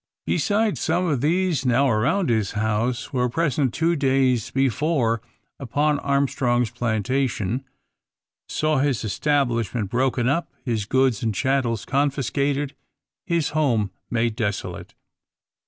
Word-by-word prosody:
Besides, 215 0 +1
some 180 - +1
of 145 -8 0
these 170 -1 +1
now 130 +2 +3
around 130 - +1
his 110 -4 0
house 110 +4 -1
were 125 -1 +1
present 145 -2 0
two 165 +6 +1
days 130 -5 +2
before 135 -3 +1 0.4
upon 145 +3 0
Armstrong's 130 -4 +1
plantation; 120 0 -1 0.9
saw 155 -2 +1
his 135 -3 0
establishment 115 -4 0
broken 125 -1 +1
up, 165 +6 0 0.2
his 115 -5 -1
goods 130 -1 +2
and 110 -3 -1
chattels 130 -4 0
confiscated, 140 0 0 0.5
his 170 -4 +1
home 130 -9 +1 0.2
made 115 -2 0
desolate. 105 -4 -4
130 Hz, 115 wpm, -23 LUFS, 115-145 Hz, 0.9 s, now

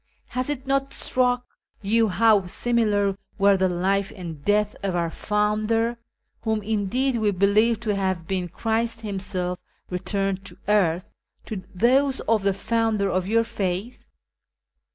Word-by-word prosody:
Has 255 +2 -2
it 275 -3 -3
not 275 0 0
struck 250 -1 +1 0.4
you 225 +3 +3
how 205 -1 +3
similar 205 -2 +1 0.2
were 200 0 +5
the 190 -1 +2
life 195 +3 0
and 165 -6 -8
death 210 +2 +2
of 195 -2 -1
our 170 -1 0
Founder 215 +4 0 0.4
(whom, 220 -2 -1
indeed, 220 +5 0
we 215 -2 +2
believe 205 +4 +3
to 215 -3 0
have 190 -4 -1
been 185 -2 -1
Christ 225 +5 -1
Himself 190 -3 -3 0.3
returned 195 +1 -1
to - - -10
earth) 185 -5 +2 0.4
to 215 - -4 0.2
those 265 +6 +3
of 225 -2 +2
the 200 0 +2
Founder 220 -2 0
of 185 +1 0
your 230 +2 +3
faith 200 +2 -4
210 Hz, 140 wpm, -24 LUFS, 190-230 Hz, 0.4 s, were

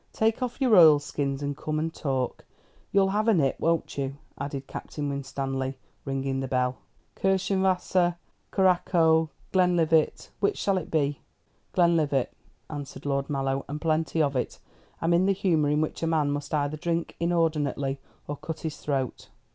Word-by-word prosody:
"Take 220 +2 +1
off 250 0 -3
your 255 -5 +4
oilskins 145 -3 +4
and 140 0 -2
come 155 +1 -3
and 160 +1 -1
talk. 130 -4 -2 0.5
You'll 195 -1 +4
have 210 +3 0
a 225 - +5
nip, 140 -6 +1
won't 165 -3 0
you?" 135 0 -2 0.2
added 140 0 -5
Captain 145 +1 -5
Winstanley, 135 -1 -3 0.3
ringing 135 -1 -1
the 135 - -2
bell. 125 -1 0 0.4
"Kirschenwasser, 190 -2 +2 0.4
curaçoa, 175 -4 +3 0.2
Glenlivat 170 -4 +2
which 200 - +1
shall 195 -2 +1
it 165 - -9
be?" 145 -3 0 0.5
"Glenlivat," 160 -7 +3 0.4
answered 145 -2 -7
Lord 140 -1 -1
Mallow, 135 -1 -1
"and 150 +1 -4
plenty 160 0 +1
of 140 -1 0
it. 125 - -2 0.5
I'm 165 +1 +3
in 180 +3 +4
the 195 - +4
humour 170 -7 +2
in 150 +1 +2
which 155 - -3
a 165 - 0
man 155 -3 +2
must 145 0 -4
either 150 0 0
drink 170 +2 -2
inordinately 150 -5 0 0.3
or 145 - -4
cut 160 +1 -6
his 160 -2 -4
throat." 135 -4 -3
155 Hz, 155 wpm, -27 LUFS, 140-175 Hz, 0.5 s, a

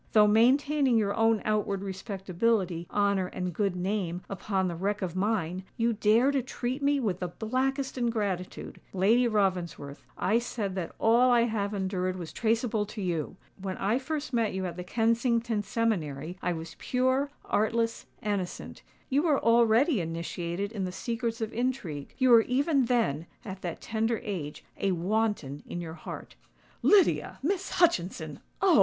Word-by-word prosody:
Though 215 -1 +7
maintaining 260 +4 +4
your 200 -2 +1
own 225 -1 +2
outward 205 -2 0
respectability, 190 -2 -1
honour, 200 -2 +1
and 180 -1 -4
good 195 0 0
name 180 -1 -2
upon 190 -1 -1
the 175 - -3
wreck 200 +4 -1
of 180 -2 -3
mine, 185 -3 -1
you 230 0 +2
dare 225 +5 +4
to 275 -2 +1
treat 255 +2 -4
me 285 0 +2
with 200 -8 -1
the 180 - -2
blackest 260 +7 -2
ingratitude! 205 -7 -2
Lady 220 +6 +4
Ravensworth, 180 -9 -1
I 220 +4 +2
said 220 -5 -3
that 185 -3 -4
all 235 +3 +4
I 240 -1 +5
have 215 -3 -1
endured 185 -1 -1
was 175 -3 -7
traceable 225 -1 +1
to 215 - -8
you! 175 -4 -2 0.3
When 190 -1 -4
I 215 +6 +1
first 285 0 -4
met 225 -5 +1
you 190 0 -2
at 175 -2 -4
the 180 - -5
Kensington 230 +2 +1
seminary, 180 -8 -1
I 180 - 0
was 165 -1 -6
pure, 260 +2 +1 0.2
artless, 230 +2 0 0.2
innocent:—you 205 +7 -3
were 305 -4 +3
already 230 - +4
initiated 170 +3 -3
in 205 -4 -3
the 185 - -2
secrets 230 +4 -3
of 220 0 -3
intrigue—you 245 - -2
were 235 -2 +8
even 275 +3 +2
then, 220 - 0 0.2
at 190 -2 -7
that 175 -2 -5
tender 225 0 -1
age, 175 -10 -5
a 195 -1 +1
wanton 180 -6 -1
in 175 - -5
your 165 -2 -6
heart." - - -8 0.5
"Lydia—Miss 385 -2 +2
Hutchinson! 180 - +1 0.2
Oh! 365 -6 +6
210 Hz, 155 wpm, -29 LUFS, 185-235 Hz, 0.5 s, were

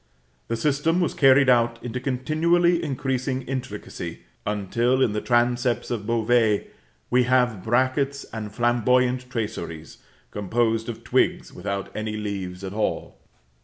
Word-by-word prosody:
The 115 - -2
system 150 +7 +1
was 175 - 0
carried 135 -1 +5
out 120 -2 +3
into 125 +1 -4
continually 165 +7 +2
increasing 130 -2 -2
intricacy, 130 0 -6 0.3
until, 115 +5 +1
in 130 -5 +3
the 105 - -1
transepts 120 0 +1
of 105 -3 -3
Beauvais, 115 -2 +2 0.5
we 125 0 +4
have 125 -6 +2
brackets 130 +4 +1
and 110 -2 -5
flamboyant 125 +2 +1
traceries, 85 -9 -5 0.3
composed 115 +3 0
of 115 - -7
twigs - - +1
without 100 -1 -5
any 110 0 -3
leaves 100 -3 -5
at 95 0 -5
all. 105 0 -2
120 Hz, 130 wpm, -24 LUFS, 110-130 Hz, 0.5 s, carried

